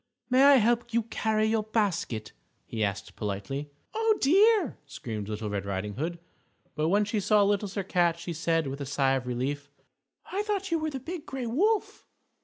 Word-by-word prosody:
"May 255 +1 +5
I 280 0 +8
help 235 0 +2
you 235 - +3
carry 220 -1 0
your 220 0 +2
basket?" 190 - -1 0.3
he 110 -1 -2
asked 100 -1 -3
politely. 105 +8 -4 0.2
"Oh, 445 -1 +2
dear!" 390 - +4
screamed 110 -7 -6
Little 105 0 -3
Red 100 -1 -2
Riding 100 +1 -3
Hood. 165 - -3 0.6
But 155 +1 0
when 205 +3 +3
she 210 +1 -1
saw 210 +1 +4
Little 205 +1 +1
Sir 200 +1 -3
Cat, 175 -3 +2
she 170 0 -5
said, 165 0 0
with 135 +1 -5
a - - -3
sigh 135 -1 +2
of 130 -2 -2
relief, 140 +4 -3 0.6
"I 390 - 0
thought 400 -3 -2
you 330 - +2
were 315 0 -1
the 275 -3 -5
Big 330 +4 -7
Gray 265 -2 -4
Wolf!" 395 - 0
200 Hz, 190 wpm, -28 LUFS, -, 0.6 s, I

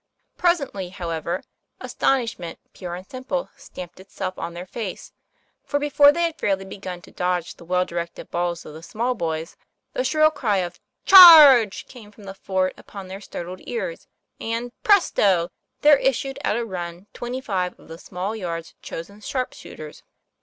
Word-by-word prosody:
Presently, 280 - 0
how 180 -3 -6
ever, 170 +3 -3 0.4
astonishment 230 -10 -1 0.2
pure 175 -2 -6
and 185 +1 -10
simple 260 - -4
stamped 180 0 -11
itself 190 0 -6
on 170 - -6
their 175 +1 -7
faces; 200 0 -7 0.5
for 285 - -1
before 290 0 +5
they 340 +3 -1
had 335 -1 -2
fairly 195 -1 0
begun 185 -2 -8
to - - -15
dodge 180 -1 -2
the 170 - -16
well 180 +1 +1
directed 170 -1 -6
balls 175 0 -2
of - - -10
the 160 - -10
small 235 +8 -2
boys, 160 -6 -4 0.4
the - - -1
shrill 310 -6 +3
cry 225 -9 0
of 175 -2 -3 0.2
" - - -53
Charge!" 295 - +10
came 225 -5 -13
from 210 0 -17
the 195 -1 -8
fort 190 -1 -1
upon 195 -2 -10
their 195 +2 -8
startled 180 -2 -7
ears, - - -5 0.3
and 230 +2 -3
presto! 200 - +3 0.3
there 295 -1 +7
issued 270 +1 -1
at 220 - +1
a 235 - -2
run 175 -2 -6
twenty 245 +2 -5
five 185 -7 -3
of - - -18
the 165 +1 -10
small 190 +4 -5
yard's 170 -5 -5
chosen 200 +6 -8
sharp 255 +3 -3
shooters. 155 -1 -11
195 Hz, 170 wpm, -23 LUFS, 175-255 Hz, 0.5 s, Charge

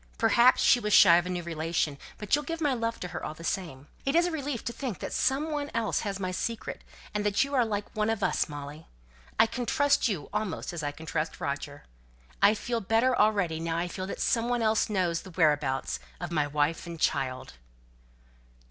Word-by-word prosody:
Perhaps 235 +2 +5
she 245 - +6
was 210 -2 -1
shy 170 -3 +8
of 175 +1 0
a - - -4
new 180 -1 -3
relation; 160 -3 -2 0.2
but 210 -2 -6
you'll 295 - +4
give 330 +3 -4
my 295 -4 +1
love 230 -1 -2
to 180 - -4
her, - - -6
all 155 - -5
the 165 - -11
same. 160 -6 -3 0.2
It 275 +3 0
is 340 +1 +5
a 355 - -1
relief 285 -6 -4
to 235 - -3
think 245 - -4
that - - -6
some 285 +4 +1
one 290 -1 -2
else 230 -2 0
has 200 -2 -3
my 185 -1 -2
secret; 225 +4 -4 0.3
and 210 +1 +2
you 280 +1 -6
are 255 -3 +4
like 205 -2 -4
one 215 0 +1
of 220 -2 -1
us, - - +1
Molly. 145 +1 -8 0.5
I - - +7
can 245 +1 -4
trust 285 -3 +3
you 185 -10 -3
almost 210 -4 -3
as 170 - -4
I 145 -1 -2
can 160 +2 -11
trust 160 0 -3
Roger. 145 +1 -4 0.6
I 210 +2 +6
feel 235 +2 -2
better 225 +5 +2
already, 200 -8 +2
now 165 0 -2
I 175 +1 -1
feel 185 +2 -5
that - - -6
some 230 0 +1
one 245 -1 +1
else 220 0 +2
knows 180 -5 0
the 190 - -11
whereabouts 150 - +1 0.2
of - - -5
my 150 -3 +1
wife 150 +3 0
and 170 -1 -7
child." 130 -4 -1
200 Hz, 220 wpm, -28 LUFS, 160-235 Hz, 0.6 s, shy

